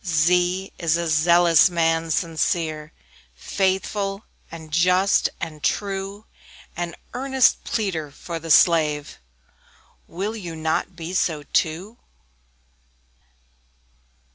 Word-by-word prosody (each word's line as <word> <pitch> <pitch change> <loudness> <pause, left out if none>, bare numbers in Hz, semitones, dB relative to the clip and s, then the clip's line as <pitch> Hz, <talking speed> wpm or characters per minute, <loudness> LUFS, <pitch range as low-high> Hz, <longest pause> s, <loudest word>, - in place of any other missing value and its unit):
Z 165 -4 +1
Z 180 +2 +1
is 165 -1 +1
a 170 0 -2
Zealous 170 +3 +5
man, 165 -1 0
sincere, 155 -1 -1 0.4
Faithful, 195 - -2 0.3
and 160 -2 -11
just, 180 +4 +3
and 155 -2 -6
true; 200 +1 -2 0.5
An 175 -1 -4 0.2
earnest 265 0 +2
pleader 180 -9 -2
for 165 +4 -7
the 165 +1 -9
slave 150 -2 +3 0.9
Will 200 +6 -4
you 175 -7 -7
not 160 +3 -2
be 170 +1 -7
so 160 -5 0
too? 175 +9 -2
170 Hz, 100 wpm, -22 LUFS, 160-190 Hz, 0.9 s, Zealous